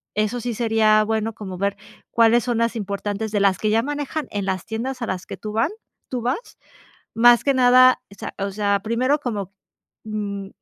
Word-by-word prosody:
eso 215 +3 0
sí 240 +1 -3
sería 220 -2 +3
bueno 220 +1 -1
como 190 -4 -7
ver 200 +1 -1 0.3
cuáles 230 0 +4
son 240 -2 0
las 230 0 0
importantes 205 0 -3
de 210 - +1
las 195 -2 +3
que 215 - 0
ya 225 +1 +3
manejan 290 +2 -3
en 200 -2 -3
las 190 -2 -2
tiendas 250 +4 -4
a 235 - -2
las 185 -1 -4
que - - -8
tú 210 -1 -7
van 225 - +1 0.4
tú 255 - -2
vas, 255 - -3 0.6
más 240 +1 +6
que 275 - +3
nada, 255 0 +6
o - - -13
sea - - -7
o 200 0 -2
sea, 200 0 +1
primero 250 +7 0
como, 205 -8 -4 0.5
mm, 205 -2 -4
220 Hz, 200 wpm, -22 LUFS, 200-245 Hz, 0.6 s, más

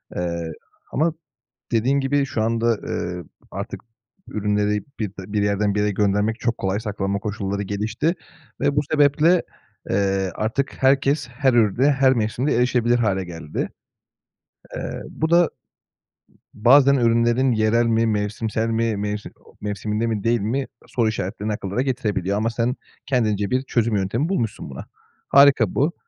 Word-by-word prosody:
Eee, 85 -2 -3 0.4
ama 160 +4 +1 0.6
dediğin 125 +5 +2
gibi 140 +1 +1
şu 115 - -3
anda, 115 0 +1
eee, 90 0 -3 0.3
artık - - -6 0.5
ürünleri 105 -1 0 0.2
bip 105 - -1
bir 100 +2 -2
yerden 100 0 +1
bir - - +1
yere 105 0 +1
göndermek 105 +3 +1
çok 115 -1 -1
kolay. 95 +1 -1
Saklama 100 -2 -2
koşulları 100 -1 -3
gelişti 110 - -1 0.5
ve 140 - +2
bu 145 - +3
sebeple, 155 +4 +4 0.5
eee, 95 -1 +1
artık 115 +6 -1
herkes 135 +1 +3
her 130 +1 +1
ürüne 120 +5 +3
her 135 -1 +4
mevsimde 120 +4 0
erişebilir 120 -1 +2
hâle 95 -4 0
geldi. 80 -3 -5 1.1
Eee, - - -5
bu 160 - -2
da, 170 - +5
ııı, 175 - +4 1.0
bazen 135 +5 +5
ürünlerin 120 +1 +3
yerel 110 +1 +2
mi 115 0 +2
mevsimsel 110 +1 -1
mi, 115 -1 0
mevsim 105 +1 -4
o - - -19
mevsiminde 105 +2 -2
mi 110 -3 -2
değil 115 -1 +2
mi 130 +6 -1 0.2
soru 115 -3 0
işaretlerini 105 +1 -3
akıllara 100 +4 -2
getirebiliyor. 105 -7 -1
Ama 110 +2 +1
sen 115 +2 -1 0.3
kendince 110 -6 0
bir 130 +1 +1
çözüm 115 -4 0
yöntemi 110 - 0
bulmuşsun 115 - -2
buna. 65 - -8 0.4
Harika 140 -7 +5
bu. 150 +5 +2
110 Hz, 145 wpm, -22 LUFS, 105-130 Hz, 1.1 s, da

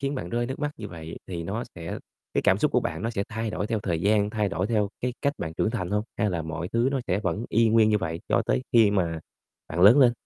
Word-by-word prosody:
khiến 140 +1 -1
bạn 85 -9 -4
rơi 120 +4 -1
nước 130 - -5
mắt 145 0 -1
như - - -7
vậy 80 -1 -8
thì 85 -3 -4
nó 105 +7 -3
sẽ 85 -1 -5 0.4
cái - - +2
cảm - - +4
xúc - - +1
của - - +4
bạn 80 +2 -3
nó 115 - -1
sẽ 100 -4 -1
thay 110 -1 -3
đổi 105 - -2
theo 110 0 -1
thời 85 -5 -1
gian, 105 +2 +2
thay 105 -2 0
đổi 95 -1 -1
theo 105 -3 +1
cái 125 0 -1
cách 140 - +2
bạn 80 0 -4
trưởng 110 - +1
thành 90 -6 -3
hông? 105 0 +1 0.2
Hay 105 -3 +2
là 85 -2 -2
mọi 85 +2 -4
thứ 115 +2 +2
nó 135 - 0
sẽ 95 +3 0
vẫn 100 +4 -1
y 115 +1 +3
nguyên 110 -1 +5
như 105 -1 +3
vậy 85 -2 -3
cho - - +3
tới 60 +2 +1
khi 115 -4 +6
mà 85 -5 0 0.5
bạn 85 +3 -3
lớn 110 +9 +8
lên. 125 -3 +6
105 Hz, 285 wpm, -26 LUFS, 85-115 Hz, 0.5 s, lớn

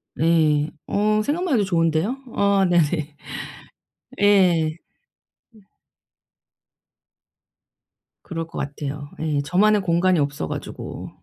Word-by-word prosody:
네. 155 -2 +2 0.2
어 215 +1 +1
생각만 330 +3 -1
해도 215 - +3
좋은데요. 170 - +1 0.2
아 200 -1 +3
네네. 155 -3 +1 1.1
예. 180 -6 +4 0.8
으. 215 - -18 2.6
그럴 165 -2 -5
것 165 - -10
같아요. 145 0 -5
예. 150 -2 0
저만의 205 +7 +3
공간이 175 0 +2
없어 140 - -2
가지고. - - -7
170 Hz, 180 characters per minute, -22 LUFS, 150-200 Hz, 2.6 s, 예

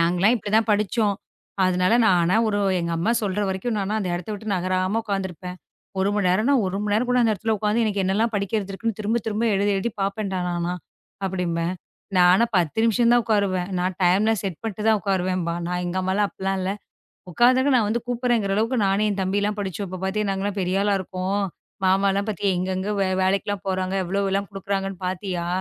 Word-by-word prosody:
நாங்கலாம் 180 +7 +3
இப்படி 205 -1 -6
தான் 225 0 +3
படிச்சோம். 210 0 +1 0.5
அதனால 185 +3 +2
நானா 175 -2 +3
ஒரு 205 - 0 0.2
எங்க 170 - -2
அம்மா 190 +8 +1
சொல்ற 205 -1 -1
வரைக்கும் 190 +5 -2
நானா 200 +1 -1
அந்த 190 - -2
இடத்தை 175 +4 -5
விட்டு 215 +1 -7
நகராம 185 +3 0
உட்கார்ந்து 195 -3 -2
இருப்பேன். 180 +1 -8 0.4
1 190 - +2
மணி 205 -3 +1
நேரம் 215 +9 +2 0.2
1 185 +1 -2
மணி 210 -1 -1
நேரம் 235 +4 +1
கூட 250 - +3
அந்த 225 -2 +3
இடத்துல 220 +2 -1
உக்காந்து 210 +3 +1
எனக்கு 205 -2 0
என்னலாம் 215 +5 +1
படிக்கிறது 200 0 -1
இருக்குன்னு 220 +2 -3
திரும்பத் 220 +2 -1
திரும்ப 220 +1 -1
எழுதிக் 200 +1 +1
எழுதிப் 205 +2 -3
பாப்பேன். 200 0 -2 0.3
ஆனா 175 +1 -1 0.5
அப்படின்னு 175 -3 -1 0.5
நானா 180 +5 +6
10 170 +2 0
நிமிஷம் 235 +1 +3
தான் 240 - +4
உக்காருவேன். 200 -4 0
நான் 180 0 -1
டைம்லாம் 205 +4 +3
செட் 190 -5 -4
பண்ணிட்டு 215 -1 -4
தான் 220 -1 +4
உக்காருவேன். 185 -1 0 0.3
நான் 180 0 -2
எங்க 175 - -3
அம்மா 185 0 0
எல்லாம் 205 0 +2
அப்படி - - -14
எல்லாம் 195 0 0
இல்ல. 185 +1 -1 0.6
உக்காந்துட்டாங்க. 255 - +4
நான் 220 -4 +2
வந்து 230 +2 -1
கூப்பிடுறேன். 240 -3 +1
அளவுக்கு 230 +4 +1
நானும் 200 +1 +1
தம்பி 190 +2 0
எல்லாம் 210 0 -1
படிச்சு 190 0 -4
இப்ப 185 0 -7
பாத்தீங்கன்னா 200 0 -1
பெரிய 185 +2 0
ஆளா 205 -1 +2
இருக்கோம். 190 +2 -2 0.4
மாமா 195 +1 +3
எல்லாம் 200 +2 -1
பாத்தியா 200 -1 0
எங்க 185 +1 -2
எங்க 195 +3 -2 0.3
வேலைக்கெல்லாம் 195 +1 -1
போறாங்க. 185 0 -1
எவ்வளவு 195 +2 0
எல்லாம் 200 0 -1
கொடுக்குறாங்கன்னு 195 -1 -3
பாத்தியா. 180 -1 -3
195 Hz, 190 wpm, -23 LUFS, 185-215 Hz, 0.6 s, நானா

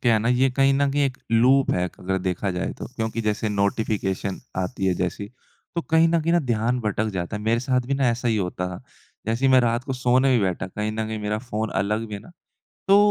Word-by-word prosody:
क्या 120 -2 +4
है 110 - +3
ना, 115 +3 0
ये 130 +2 +3
कहीं 135 +1 +3
न 140 0 +2
कहीं 145 +1 +1
एक 130 -2 -2 0.2
लूप 130 +4 +4
है 90 - +1
एक 90 - -7
अगर 95 +1 -1
देखा 95 +1 -2
जाए 90 0 -2
तो। - - -5
क्योंकि 110 0 -2
जैसे 110 0 -1
नोटिफ़िकेशन 100 -1 -1 0.2
आती 95 +1 -2
है 95 - +2
जैसी, 90 +3 -3 0.5
तो 170 - 0
कहीं 160 +1 +5
न 165 0 +2
कहीं 165 +2 0
न 175 - +5
ध्यान 120 +1 0
भटक 110 0 -1
जाता 90 +4 -3
है। 105 - -6
मेरे 115 +2 +1
साथ 130 -1 +1
भी 140 - 0
ना 135 -2 +2
ऐसा 120 +1 -1
ही 110 - +2
होता 90 -1 -2
था। 90 - -8 0.4
जैसे 115 +4 -1
ही 135 - +5
मैं 130 - +7
रात 120 +1 0
को 135 - -3
सोने 130 +1 +3
भी 110 - +2
बैठा 95 0 -1
कहीं 105 +3 -3
न 110 0 -2
कहीं 110 0 -4
मेरा 105 +1 -2
फ़ोन 110 -2 -3
अलग 105 +3 -1
भी 105 - -5
है 100 - -6
ना। 175 - -15 0.6
तो 195 - +7
110 Hz, 255 wpm, -24 LUFS, 100-130 Hz, 0.6 s, मैं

